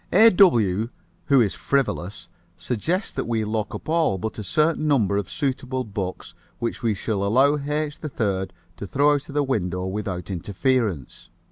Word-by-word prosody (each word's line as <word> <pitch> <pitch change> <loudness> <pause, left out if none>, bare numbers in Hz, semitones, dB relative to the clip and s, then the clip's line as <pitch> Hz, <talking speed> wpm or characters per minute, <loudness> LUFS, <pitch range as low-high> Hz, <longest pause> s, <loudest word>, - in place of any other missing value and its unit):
A. 225 +1 +7
W., 115 - +4 0.4
who 140 -3 +5
is 105 -4 +1
frivolous, 115 -8 -2 0.3
suggests 170 - -2
that - - -4
we 115 -2 0
lock 110 0 -2
up - - -9
all 160 -10 +2
but 110 +4 -5
a - - -4
certain 155 - +1
number 110 -9 +2
of 100 -3 -2
suitable 130 -2 -2
books 95 -5 -5 0.2
which 115 - -3
we 115 -3 +1
shall 100 0 -2
allow 130 +8 +4
H. 150 +1 -3
3rd 100 - -2 0.3
to 100 - -6
throw 145 +6 +3
out 145 -1 -2
the 145 +1 0
window 90 -9 -1
without 95 -2 -4
interference. 100 - -1
115 Hz, 160 wpm, -24 LUFS, 100-145 Hz, 0.4 s, A